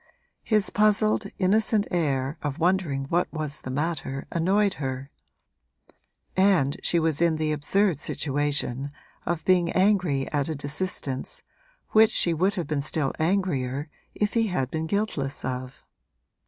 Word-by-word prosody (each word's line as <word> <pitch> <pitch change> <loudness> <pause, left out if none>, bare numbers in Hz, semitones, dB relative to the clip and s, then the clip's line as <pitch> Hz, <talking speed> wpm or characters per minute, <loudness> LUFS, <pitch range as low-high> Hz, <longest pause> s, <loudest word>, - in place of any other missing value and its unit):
His 215 -3 +1
puzzled, 215 0 +2
innocent 210 +2 +2
air 140 -5 0
of 145 -1 -3
wondering 170 -5 +1
what 175 +1 +1
was 155 -2 -4
the - - -7
matter 135 -1 -2
annoyed 195 +4 +2
her; 135 +1 -4 1.2
and 185 -8 +3
she 170 - +2
was 160 -1 0
in 170 -2 +3
the 155 0 -1
absurd 170 +4 +1
situation 145 -3 -1 0.4
of 170 -2 -2
being 180 -2 +3
angry 185 -8 +2
at 145 0 0
a 160 - -2
desistence 145 -2 -3 0.5
which 220 0 +6
she 170 - +2
would 185 +5 +1
have 175 -4 -2
been 145 -1 -1
still 145 -1 -1
angrier 150 -6 0 0.2
if 210 -1 0
he 225 -1 +2
had 135 -10 -1
been 160 0 -2
guiltless 160 -9 -2
of. 130 0 -5
160 Hz, 140 wpm, -26 LUFS, 140-190 Hz, 1.2 s, which